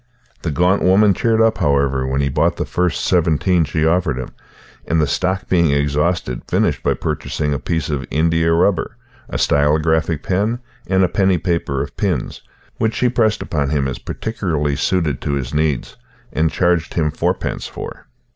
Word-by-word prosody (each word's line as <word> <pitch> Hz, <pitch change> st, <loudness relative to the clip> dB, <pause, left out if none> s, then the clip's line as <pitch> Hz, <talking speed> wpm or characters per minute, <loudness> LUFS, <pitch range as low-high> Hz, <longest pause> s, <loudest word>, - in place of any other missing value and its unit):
The 85 Hz, -, -2 dB
gaunt 90 Hz, +6 st, +2 dB
woman 100 Hz, +2 st, +5 dB
cheered 115 Hz, +3 st, +1 dB
up, 115 Hz, 0 st, +2 dB
however, 70 Hz, -2 st, +1 dB
when 65 Hz, +1 st, 0 dB
he 70 Hz, -, 0 dB
bought -, -, +1 dB
the -, -, -3 dB
first 90 Hz, -1 st, -1 dB
seventeen 85 Hz, 0 st, +2 dB
she 80 Hz, +1 st, -1 dB
offered 80 Hz, -4 st, +1 dB
him, 65 Hz, -, -5 dB, 0.6 s
and, 80 Hz, -, +1 dB
the 75 Hz, -, +3 dB
stock 95 Hz, +5 st, -1 dB
being 85 Hz, -3 st, +3 dB
exhausted, 70 Hz, -1 st, 0 dB
finished -, -, +1 dB
by -, -, +1 dB
purchasing 75 Hz, -1 st, -2 dB
a 70 Hz, -, -2 dB
piece 80 Hz, -4 st, -2 dB
of 70 Hz, -2 st, -3 dB
india 80 Hz, +1 st, +2 dB
rubber, 85 Hz, +1 st, +1 dB, 0.3 s
a -, -, -3 dB
stylographic 75 Hz, +2 st, +2 dB
pen, 105 Hz, +5 st, 0 dB, 0.3 s
and 95 Hz, 0 st, +3 dB
a -, -, +4 dB
penny 95 Hz, 0 st, +2 dB
paper 85 Hz, -6 st, -1 dB
of 70 Hz, -, -9 dB
pins, 90 Hz, -11 st, -2 dB, 0.4 s
which 110 Hz, 0 st, 0 dB
she 125 Hz, -, +2 dB
pressed 110 Hz, -3 st, +1 dB
upon 70 Hz, -4 st, -1 dB
him 70 Hz, -2 st, 0 dB
as 65 Hz, -, -4 dB
particularly 85 Hz, -10 st, -2 dB
suited 80 Hz, -3 st, 0 dB
to 70 Hz, -, -2 dB
his 65 Hz, -2 st, -3 dB
needs 75 Hz, -3 st, -1 dB, 0.4 s
and 80 Hz, +1 st, +2 dB
charged 90 Hz, -3 st, 0 dB
him 75 Hz, -2 st, +1 dB
fourpence -, -, -2 dB
for. -, -, -9 dB
80 Hz, 175 wpm, -19 LUFS, 75-90 Hz, 0.6 s, woman